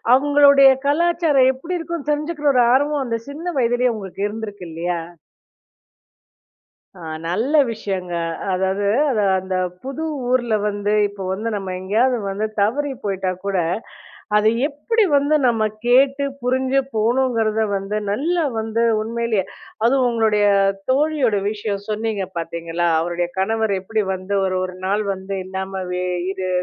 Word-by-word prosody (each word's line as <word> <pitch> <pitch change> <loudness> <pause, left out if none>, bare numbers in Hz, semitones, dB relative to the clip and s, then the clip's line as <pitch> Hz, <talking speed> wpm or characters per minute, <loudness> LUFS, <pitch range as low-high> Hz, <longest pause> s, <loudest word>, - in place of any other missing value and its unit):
அவுங்களுடைய 280 0 +6 0.2
கலாச்சாரம் 310 -4 +3
எப்பிடி 335 +8 -4
இருக்குன்னு 330 -3 -5
தெரிஞ்சுக்கிற 300 0 -2
ஒரு 250 - +5
ஆர்வம் 285 +2 +2
அந்த 230 -2 -2
சின்ன 305 +5 -8
வயதிலே 245 0 +2
உங்களுக்கு 195 -1 -6
இருந்திருக்கு 205 -3 -7
இல்லையா! 170 +1 -2 2.0
ஆ. - - -11 0.3
நல்ல 225 - -1 0.2
விஷயங்க. 190 -5 -4 0.4
அதாவது 190 +2 0 0.2
அது 215 -4 +1 0.2
அந்த 185 0 -3 0.3
புது 275 +4 -5 0.3
ஊர்ல 240 -3 +2
வந்து 205 0 -1 0.2
இப்போ 200 -1 -8
வந்து 220 +4 -3
நம்ம 195 -2 -4
எங்கேயாவது 225 +7 +1
வந்து 200 +3 -2 0.2
தவறி 280 +8 +1
போயிட்டாகூட, 195 -1 -2 0.8
அது 215 +1 +4 0.2
எப்பிடி 410 +10 0
வந்து 285 +2 +3
நம்ம 225 -2 +2 0.2
கேட்டு 270 +3 +4 0.2
புரிஞ்சு 260 +2 +1
போகணுங்கிறத 225 -1 +1
வந்து 195 +2 -3
நல்லா 330 +9 0 0.2
வந்து 225 +1 -1 0.2
உண்மையிலேயே, 230 -2 -1 0.4
அதுவும் 255 0 +3
உங்களுடைய 215 -2 +2 0.5
தோழியோட 280 -5 +2 0.2
விஷயம் 205 -2 -4
சொன்னீங்க 215 -2 -2
பார்த்தீங்களா! 170 +1 -2
அவருடைய 175 +1 -1
கணவர் 220 +1 +1
எப்பிடி 215 +3 -1
வந்து 185 +2 -5
ஒரு 185 0 0
ஒரு 185 0 -5
நாள் 205 +2 +1
வந்து 190 +1 -7
இல்லாமல 190 -1 -4
அது 175 - -3
இது, 185 -1 -4
220 Hz, 130 wpm, -20 LUFS, 195-270 Hz, 2.0 s, அவுங்களுடைய